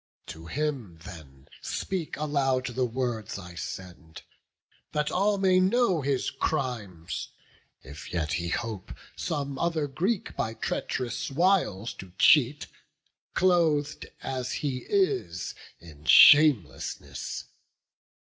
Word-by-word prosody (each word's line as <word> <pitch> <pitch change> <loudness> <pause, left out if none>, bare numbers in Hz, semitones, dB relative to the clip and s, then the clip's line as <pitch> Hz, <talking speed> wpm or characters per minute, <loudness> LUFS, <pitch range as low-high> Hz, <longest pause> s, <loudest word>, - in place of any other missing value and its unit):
To 80 +1 -9
him 135 - -3
then 70 -7 -12
speak 185 -5 -3
aloud 140 -4 0
the 125 0 -1
words 120 -4 -3
I 90 -3 -9
send, 85 -1 -8 0.7
That 150 0 0
all 200 +2 +2
may 190 -1 +4
know 190 -3 +3
his 135 -1 -1
crimes, 110 - -3 0.5
if 70 +3 -10
yet 80 -4 -1
he 85 0 -2
hope 110 -1 -4 0.2
Some 140 -4 -3
other 165 -3 0
Greek 185 - -2
by 110 +1 -2
treach'rous 120 0 -3
wiles 145 - +1
to 95 -2 -10
cheat, 145 0 +5 0.7
Cloth'd 165 -5 +2 0.2
as 130 -2 -3
he 135 -4 -3
is 395 -1 0 0.3
in 75 -3 -15
shamelessness! 145 - +5
130 Hz, 110 wpm, -27 LUFS, 95-155 Hz, 0.7 s, cheat